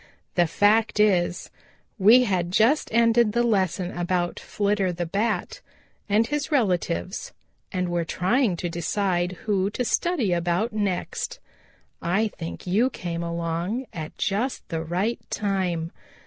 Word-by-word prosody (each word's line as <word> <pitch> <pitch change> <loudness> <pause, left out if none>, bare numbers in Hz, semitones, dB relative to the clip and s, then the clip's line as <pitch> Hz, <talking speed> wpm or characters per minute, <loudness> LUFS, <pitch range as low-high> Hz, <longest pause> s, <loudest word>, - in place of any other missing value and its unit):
"The 175 -2 +3
fact 210 +6 +3
is, 180 -4 +2 0.5
we 225 +6 +7
had 185 -6 0
just 225 - +3
ended 230 -1 +4
the 240 +1 +2
lesson 190 -5 0
about 175 0 -1
Flitter 200 -2 0
the 175 0 -3
Bat 200 +2 -2 0.5
and 215 +3 +4
his 295 +4 -2
relatives, 180 - 0 0.4
and 180 -1 -1
were 175 -1 0
trying 190 +5 +1
to 175 - -3
decide 175 +1 -1
who 200 -2 +1
to 250 +4 -2
study 270 - +1
about 175 +6 0
next. 200 -4 -2 0.6
I 200 +6 +1
think 165 -4 -8
you 210 +8 +2
came 170 -8 -5
along 170 +8 -2
at 155 -3 -7
just 220 +7 -1
the 160 -2 -2
right 185 +8 -1
time. 185 -5 -1
190 Hz, 135 wpm, -25 LUFS, 175-220 Hz, 0.6 s, we